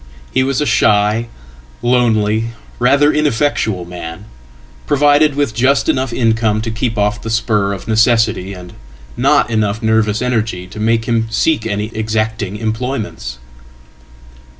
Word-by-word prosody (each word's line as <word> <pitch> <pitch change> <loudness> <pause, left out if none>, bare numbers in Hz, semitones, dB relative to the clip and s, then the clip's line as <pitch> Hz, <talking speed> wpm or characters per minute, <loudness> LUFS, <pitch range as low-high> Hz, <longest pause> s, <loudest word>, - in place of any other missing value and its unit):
He 130 - +3
was 135 0 0
a 150 - 0
shy, 105 -1 +2 0.6
lonely, 115 -2 +1 0.3
rather 140 +4 +4
ineffectual 120 - 0
man, 85 +2 -8 0.6
provided 145 +1 +3
withjust 135 0 +1
enough 130 -1 0
income 110 -2 +1
to 115 0 -3
keep 115 0 -2
off 105 +3 0
the 115 - -6
spur 110 -3 +1
of 100 0 -6
necessity, 110 -4 +2
and 90 -2 -10 0.4
not - - +2
enoughnervous 110 0 +1
energy 110 -7 -1
to 90 - -10
make 115 +1 +1
him 115 -1 0
seek 115 +1 +1
any 105 +1 -3
exacting 110 -2 -2
employments. 110 - -4
110 Hz, 125 wpm, -16 LUFS, 105-125 Hz, 0.6 s, rather